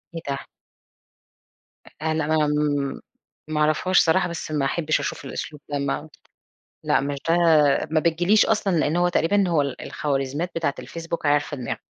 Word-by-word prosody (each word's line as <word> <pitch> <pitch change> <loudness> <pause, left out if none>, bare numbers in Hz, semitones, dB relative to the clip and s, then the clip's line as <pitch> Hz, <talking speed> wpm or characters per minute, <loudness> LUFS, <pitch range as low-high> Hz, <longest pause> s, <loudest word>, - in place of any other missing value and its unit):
إيه 165 - -4
ده؟! 140 - -1 1.6
أ 160 0 0
لا 155 0 0
آمم 145 -2 -1 0.5
مأعرفهاش 155 +4 +2
صراحة، 175 +2 +3
بس 170 -1 -6
ما 145 -3 0
أحبش 155 +2 0
أشوف 130 - -4
الأسلوب 150 +2 -6
ده 145 -1 -2
ما 140 +3 -3 0.8
لأ - - +3
مش 140 0 -3
ده 165 - +4 0.6
ما 160 0 +2
بتجيليش 175 +6 +3
أصلًا، 205 -4 +1
لأن 155 0 +1
هو 175 0 +3
تقريبًا 190 +3 +2
هو 160 -4 +2
الخوارزميات 140 +3 -3
بتاعة 155 -4 -1
الFacebook 165 0 -5
عارفة 145 0 +1
دماغي. 125 -3 -4
155 Hz, 145 wpm, -23 LUFS, 145-170 Hz, 1.6 s, ده